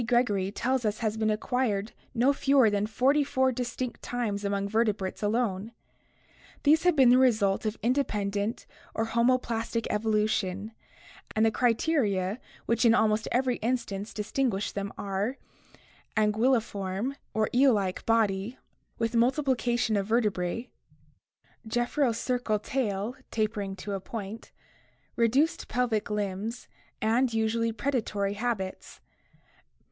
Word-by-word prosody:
Gregory 210 -6 +2
tells 255 +4 0
us 215 -1 0
has 215 -2 -1
been 220 -1 0
acquired 215 -1 0 0.2
no 250 +4 +4
fewer 270 -5 +4
than 205 0 0
forty 270 +6 +3
four 260 -1 +1
distinct 250 0 -4
times 220 -5 -2
among 200 0 -1
vertebrates 210 -3 0
alone. 215 -1 -1 0.9
These 310 +2 +5
have 355 -3 +5
been 265 -4 +6
the 250 +1 +6
result 220 -5 +3
of 215 - -3
independent 210 -4 -1 0.3
or 225 - 0
homoplastic 235 -1 0
evolution, 210 -2 0 0.6
and 220 +1 +4
the 225 - +3
criteria 230 - +1 0.3
which 230 0 +1
in 230 -1 +6
almost 220 -1 +2
every 250 0 +1
instance 215 -4 -2
distinguish 210 -1 -1
them 200 0 -4
are: 200 +6 -2 0.8
anguilliform 215 0 +1 0.4
(eel 260 +1 +5
like) 195 -3 -1
body 220 0 +1 0.4
with 230 +1 -1
multiplication 240 -2 +2
of 200 -1 0
vertebrae, 220 -1 0 1.0
gephyrocercal 240 -2 0
tail 220 -3 -2
(tapering 210 -3 -2
to 200 +2 -6
a 195 - -2
point), 215 +2 -7 0.6
reduced 260 +8 +2
pelvic 235 -4 0
limbs, 210 +3 -3 0.4
and 230 +2 +2
usually 225 +1 +1
predatory 220 -5 -1
habits. 205 -3 -4
225 Hz, 115 wpm, -28 LUFS, 205-245 Hz, 1.0 s, been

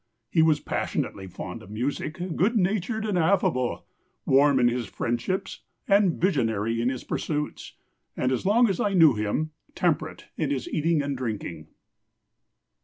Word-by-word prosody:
He 165 - +4
was 160 -2 +4
passionately 95 -7 -3
fond 90 0 -7
of 95 - -13
music, 145 - -3
good 220 +7 +2
natured 215 +3 0
and 200 -4 0
affable, 160 -8 +1 0.4
warm 140 0 +5
in 120 - +5
his 120 -2 -1
friendships 120 - -2 0.3
and 200 -3 +3
visionary 115 - +1
in 120 - +2
his 130 -2 -4
pursuits, 150 -1 -3 0.4
and, 130 - +1
as 130 - -1
long 230 +5 +4
as 195 -4 -1
I 200 -1 +1
knew 160 -6 +7
him, 110 +9 -1 0.2
temperate - - -1
in - - 0
his - - -2
eating 160 - +1
and 140 -1 -2
drinking." 105 -10 -5
145 Hz, 150 wpm, -26 LUFS, 120-185 Hz, 0.4 s, knew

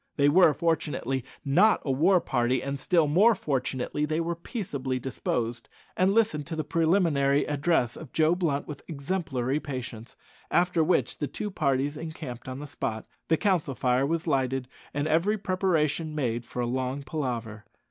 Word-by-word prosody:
They 140 -1 +4
were, 170 +1 +6
fortunately, 150 -5 -1 0.2
not 180 +11 +4
a 135 - +1
war 175 +8 +4
party, 125 -3 0
and, 140 0 -3
still 165 +3 +3
more 205 +10 +5
fortunately, 135 -3 -2
they 155 +2 0
were 170 +1 -1
peaceably 145 - -4
disposed, 120 -2 -3 0.3
and 185 +1 +3
listened 195 -10 +1
to 165 - -4
the 155 - -2
preliminary 155 -3 +2
address 145 -4 +1
of 160 -6 -10
Joe 160 +1 +3
Blunt 165 -6 -1
with 150 -2 -7
exemplary 145 -4 -2
patience; 125 -5 -7 0.3
after 175 -2 +2
which 175 +4 +1
the 145 - -1
two 210 +7 -5
parties 140 -3 0
encamped 155 -7 -7
on 130 0 -5
the 145 - -6
spot, 130 -6 -4 0.2
the 160 - +3
council 175 -9 +1
fire 125 +2 +2
was 165 +1 -1
lighted, 135 -4 0 0.2
and 145 +1 -1
every 170 +7 +2
preparation 170 -5 0
made 120 -5 -1
for 125 - -4
a - - 0
long 130 +3 -2
palaver. 120 -7 -4
145 Hz, 165 wpm, -27 LUFS, 130-165 Hz, 0.3 s, were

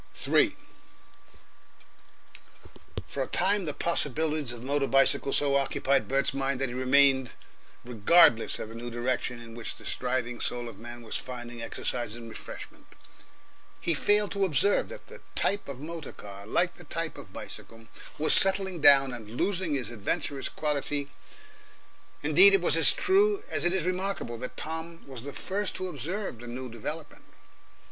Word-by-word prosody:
3 - - +2 2.5
For - - -5
a - - -1
time 195 +1 +1
the 150 - -2
possibilities 155 -3 -1
of 120 -1 -8
the - - -9
motor 140 0 +1
bicycle 135 +1 +3
so 140 -1 +2
occupied 140 0 +1
Bert's 135 0 +1
mind 135 -1 -1
that 135 -1 -1
he - - -6
remained 130 0 +3 0.5
regardless 120 +1 +4
of 110 - -6
the - - -9
new 120 +1 -6
direction 120 0 -2
in 115 -1 -11
which 115 0 -6
the - - -14
striving 125 -1 -2
soul 120 -1 -2
of 110 -4 -10
man 120 +1 -9
was 110 - -3
finding 120 -2 -7
exercise 115 -1 -2
and 115 -1 -9
refreshment. - - -10 0.9
He 170 - 0
failed 205 +7 +2
to 200 -1 0
observe 195 +3 +2
that - - -10
the - - -13
type 205 - +1
of 140 -2 -7
motor 160 0 -7
car, 100 0 -10
like 175 +8 +1
the 175 - -12
type 165 +1 -3
of 95 - -11
bicycle, 115 +3 -8 0.3
was 155 - +4
settling 190 -3 +3
down 135 -3 +7
and 110 -3 -8
losing 170 - -1
its 120 -4 -3
adventurous 120 +5 -2
quality. 145 -1 -2 1.1
Indeed, 395 +2 +7
it 390 - +1
is - - +3
as - - +7
true 400 +1 +2
as - - 0
it 175 - +5
is 190 -3 +2
remarkable 185 -9 -2
that 125 - -7
Tom 160 +1 -5
was 130 -4 -9
the 140 +3 -7
first 200 +6 -2
to 185 - -3
observe 170 - -4
the 120 - -9
new 125 +1 -6
development. 150 +7 -7
140 Hz, 165 wpm, -28 LUFS, 120-170 Hz, 2.5 s, down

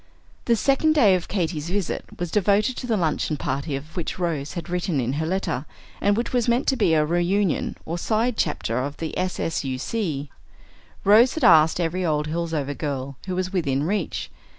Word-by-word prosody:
The 235 - +4
second 275 +6 +3
day 220 -10 +6
of 180 -1 -1
Katy's 170 -5 -2
visit 195 -1 -2
was 175 -2 -4
devoted 210 +5 +2
to 250 - -5
the 225 -3 +1
luncheon 155 -3 0
party 140 +2 -2
of 145 +4 -8
which 175 -3 -3
Rose 160 -5 -2
had 170 - -5
written 180 -3 -1
in 125 +1 -1
her 160 - -1
letter, 165 -7 -2 0.3
and 205 +1 +3
which 235 - -2
was 245 -2 +1
meant 240 +3 +2
to 270 - +2
be 165 -9 +3
a 155 -1 +3
reunion 175 +3 0
or 170 +2 -3
"side 225 +5 +1
chapter" 115 - -1
of 140 +3 -3
the 160 -1 -4
S.S.U.C. 150 - -2 0.7
Rose 220 +6 +6
had 320 - -3
asked 160 -5 +6
every 175 +2 -1
old 150 -3 +1
Hillsover 160 -4 -2
girl 140 -2 -4
who 185 - -2
was 185 +1 -2
within 140 -7 0
reach. 190 +1 -2
175 Hz, 185 wpm, -24 LUFS, 150-205 Hz, 0.7 s, day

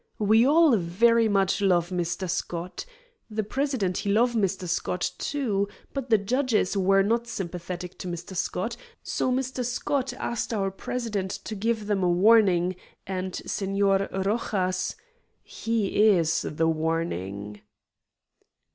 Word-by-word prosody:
"We 220 +3 +4
all 310 -2 +5
very 225 +6 +3
much 195 -1 +2
love 175 -3 +2
Mr. 180 +1 -2
Scott. 175 - -4 0.4
The 215 0 -2
president, 240 -6 -1
he 200 - -1
love 240 +4 +3
Mr. 195 -4 0
Scott, 175 +1 -1
too, 220 -9 -1 0.3
but 270 -2 -4
the 220 - +6
judges 225 -1 0
were 195 0 +4
not 230 +3 0
sympathetic 180 -3 -6
to - - -5
Mr. 175 +2 -6
Scott, 185 +5 -2 0.3
so 255 - -1
Mr. 260 0 -1
Scott 255 +2 -1
asked 235 -2 -3
our 195 -2 0
president 210 -1 -3
to - - -5
give 220 +1 -1
them 205 -2 0
a 180 - +2
warning, 185 -2 +4 0.3
and 185 -1 -4
Senor 195 0 +1
Rojas 190 -2 -1 0.5
he 220 -1 +1
is 165 -3 +1
the 160 +2 0
warning." 105 - -2
195 Hz, 130 wpm, -26 LUFS, 180-230 Hz, 0.5 s, the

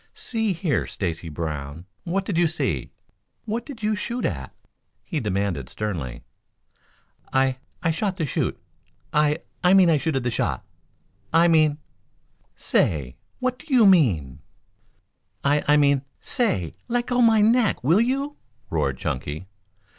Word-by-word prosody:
"See 225 -4 -1
here, 165 -6 -1
Stacy 85 -3 -4
Brown, 75 0 -5 0.2
what 190 +3 -1
did 200 - -2
you 170 0 +4
see 160 - -2 0.6
what 230 +2 -3
did 260 -7 -9
you 215 0 +2
shoot 235 +4 -3
at?" 65 -8 -3 0.5
he 155 - -3
demanded 100 - -2
sternly. 80 - -4 1.1
"I 130 -1 +2 0.3
I 165 - +3
shot 190 +3 -2
the 165 - 0
chute 140 - -2 0.5
I 150 0 +2 0.2
I 180 +2 +6
mean 185 -3 +6
I 155 - +3
chuted 135 -4 -1
the 125 - 0
shot - - -1 0.7
I 165 +1 +5
mean 155 -3 +4 0.4
" - - -42 0.2
"Say, 70 -6 +2 0.2
what 255 -1 -2
do 310 - -13
you 245 -4 +6
mean?" 95 - +3 1.0
"I 145 +1 +2
I 150 +1 +6
mean 140 -2 +4 0.2
say, 205 - -1
leggo 245 +1 +1
my 225 -2 +5
neck, 225 - +3
will 165 - +4
you?" 275 +4 -1 0.3
roared - - 0
Chunky. 75 +7 -4
155 Hz, 140 wpm, -24 LUFS, -, 1.1 s, I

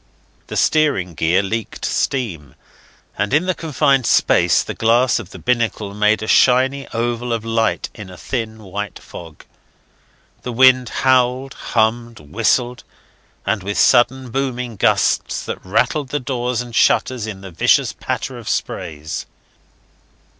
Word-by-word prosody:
The - - -5
steering 145 - +1
gear 85 +5 +1
leaked 110 +3 -4
steam, 95 - -2 0.6
and 105 +5 +1
in 160 +4 +2
the 185 - +1
confined 140 -6 +1
space - - +3
the - - -6
glass 120 +3 +2
of 105 -6 -9
the - - -11
binnacle 115 -4 -1
made 105 +1 +2
a - - -5
shiny 130 +4 +3
oval 120 +1 -2
of 115 -1 -2
light 115 0 0
in 105 -4 -10
a 90 - -11
thin 110 -2 -5
white 100 +1 -5
fog. 80 -3 -12 1.0
The 125 - -5
wind 130 0 +5 0.2
howled, 130 +1 +2
hummed, 115 0 -1
whistled, 115 - -1 0.6
with 100 -1 -2
sudden 125 0 +3
booming 125 -2 -3
gusts - - +1
that - - -6
rattled 125 +9 0
the 145 - -1
doors 125 -2 -2
and 120 -1 -9
shutters 120 -1 +2
in 100 -3 -7
the 95 -1 -9
vicious 80 - +2
patter - - -4
of - - -7
sprays. 80 -4 -4
115 Hz, 140 wpm, -19 LUFS, 105-130 Hz, 1.0 s, wind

